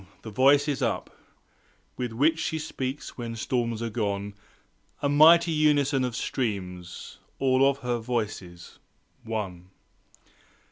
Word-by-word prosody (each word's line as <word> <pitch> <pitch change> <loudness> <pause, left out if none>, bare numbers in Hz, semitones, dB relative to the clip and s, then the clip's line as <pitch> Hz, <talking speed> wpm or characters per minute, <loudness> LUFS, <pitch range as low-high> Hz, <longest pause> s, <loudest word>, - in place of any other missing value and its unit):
the 110 - -7
Voice 140 +6 +4
is 145 -3 -1
up - - -2 0.8
With 125 -2 -3
which 150 +8 +2
she 160 - -1
speaks 135 -3 -5
when 115 -1 -4
storms 115 -1 -2
are 115 - -3
gone, 100 -2 -2 0.7
A - - +3
mighty 165 +4 +6
unison 145 -3 +2
of 125 -2 -2
streams! 90 -9 -4 0.2
Of - - -24
all 135 +1 +4
her 125 -3 -2
Voices, 105 -7 -5 0.4
One! 95 -5 -5
125 Hz, 125 wpm, -26 LUFS, 105-140 Hz, 0.8 s, mighty